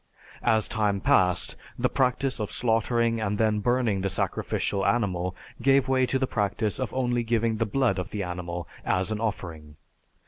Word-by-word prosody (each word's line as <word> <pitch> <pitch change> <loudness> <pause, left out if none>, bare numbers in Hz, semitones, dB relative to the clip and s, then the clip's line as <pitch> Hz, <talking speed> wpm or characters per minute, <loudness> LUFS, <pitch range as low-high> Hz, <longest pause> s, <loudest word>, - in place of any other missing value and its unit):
As 110 -1 +2
time 105 -3 0
passed, 90 -1 +2 0.2
the 125 - +2
practice 130 0 0
of 105 - -2
slaughtering 115 0 +1
and 105 -1 -1
then 110 0 +2
burning 120 -3 +1
the 95 - 0
sacrificial 95 +2 -1
animal 95 -4 0 0.3
gave 135 0 +4
way 130 -1 +2
to 135 - +1
the 130 - +1
practice 105 0 -1
of 130 -4 -2
only 120 -2 0
giving 115 -1 0
the 115 0 0
blood 115 -4 +1
of 90 - -4
the 105 -1 -3
animal 90 -1 -5 0.2
as 95 +3 0
an 110 - -2
offering. 85 -8 -4
110 Hz, 170 wpm, -26 LUFS, 95-120 Hz, 0.3 s, gave